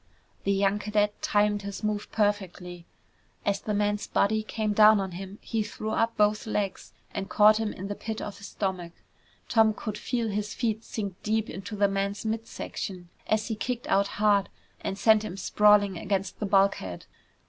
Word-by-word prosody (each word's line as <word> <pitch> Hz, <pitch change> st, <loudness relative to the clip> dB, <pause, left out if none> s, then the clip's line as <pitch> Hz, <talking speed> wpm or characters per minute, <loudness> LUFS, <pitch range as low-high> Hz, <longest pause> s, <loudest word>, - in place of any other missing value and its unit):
The 200 Hz, -, +2 dB
young 200 Hz, +1 st, +2 dB
cadet 210 Hz, 0 st, 0 dB
timed 205 Hz, 0 st, +2 dB
his 200 Hz, +1 st, -6 dB
move 210 Hz, -1 st, -2 dB
perfectly. 185 Hz, -4 st, -1 dB, 0.6 s
As 200 Hz, -1 st, 0 dB
the 210 Hz, -, -2 dB
man's 205 Hz, 0 st, 0 dB
body 215 Hz, +2 st, +2 dB
came 215 Hz, -1 st, -2 dB
down 215 Hz, 0 st, +7 dB
on 190 Hz, -1 st, -3 dB
him, 190 Hz, +3 st, -8 dB
he 225 Hz, -2 st, -1 dB
threw 215 Hz, +1 st, -4 dB
up 230 Hz, +1 st, 0 dB
both 210 Hz, +2 st, +2 dB
legs 205 Hz, -3 st, -2 dB, 0.2 s
and 200 Hz, -1 st, -4 dB
caught 210 Hz, 0 st, +6 dB
him 220 Hz, -2 st, -1 dB
in 190 Hz, -, -6 dB
the 205 Hz, -, -3 dB
pit 220 Hz, +1 st, -5 dB
of 205 Hz, -, -6 dB
his 200 Hz, -, -8 dB
stomach. 185 Hz, -4 st, -3 dB, 0.5 s
Tom 220 Hz, -2 st, +4 dB
could 215 Hz, -1 st, -5 dB
feel 235 Hz, -3 st, -1 dB
his 210 Hz, 0 st, -3 dB
feet 225 Hz, -2 st, -1 dB
sink 200 Hz, -4 st, -5 dB
deep 220 Hz, 0 st, 0 dB
into 195 Hz, +3 st, -6 dB
the 200 Hz, 0 st, +3 dB
man's 200 Hz, +2 st, -2 dB
mid 225 Hz, +1 st, -2 dB
section 180 Hz, -3 st, -6 dB, 0.2 s
as 215 Hz, +1 st, +1 dB
he 220 Hz, -, -1 dB
kicked 245 Hz, +2 st, -3 dB
out 200 Hz, +1 st, +3 dB
hard 205 Hz, -2 st, +3 dB, 0.3 s
and 195 Hz, -, -4 dB
sent 220 Hz, 0 st, +5 dB
him 195 Hz, -3 st, -6 dB
sprawling 205 Hz, -2 st, +4 dB
against 195 Hz, -1 st, -2 dB
the 210 Hz, -, -1 dB
bulkhead. 195 Hz, -, +1 dB
205 Hz, 180 wpm, -27 LUFS, 195-215 Hz, 0.6 s, down